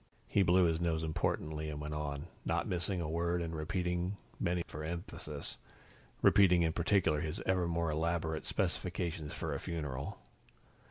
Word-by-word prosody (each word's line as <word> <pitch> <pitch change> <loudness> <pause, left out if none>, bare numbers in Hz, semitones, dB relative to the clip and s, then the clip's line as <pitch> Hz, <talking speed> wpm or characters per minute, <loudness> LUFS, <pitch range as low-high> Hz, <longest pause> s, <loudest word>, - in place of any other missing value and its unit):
He 100 - +3
blew 90 0 +5
his 80 0 +1
nose 80 -2 +1
importantly 80 -1 -1
and 75 -1 -4
went 75 0 -4
on, 75 -1 -3 0.2
not - - 0
missing 90 +1 0
a 80 - -2
word, 85 +2 +1
and 85 -1 -3
repeating 90 +4 -1 0.2
many 85 0 +1
for 75 - -7
emphasis 80 -3 -5 0.6
repeating 90 -4 +7
in 80 -1 +2
particular 85 -4 +3
his 80 -2 -3
ever 90 -2 +2
more 85 -1 0
elaborate 80 0 0
specifications 85 -5 -1
for - - -3
a - - -2
funeral. 70 -5 -4
85 Hz, 155 wpm, -34 LUFS, 75-90 Hz, 0.6 s, repeating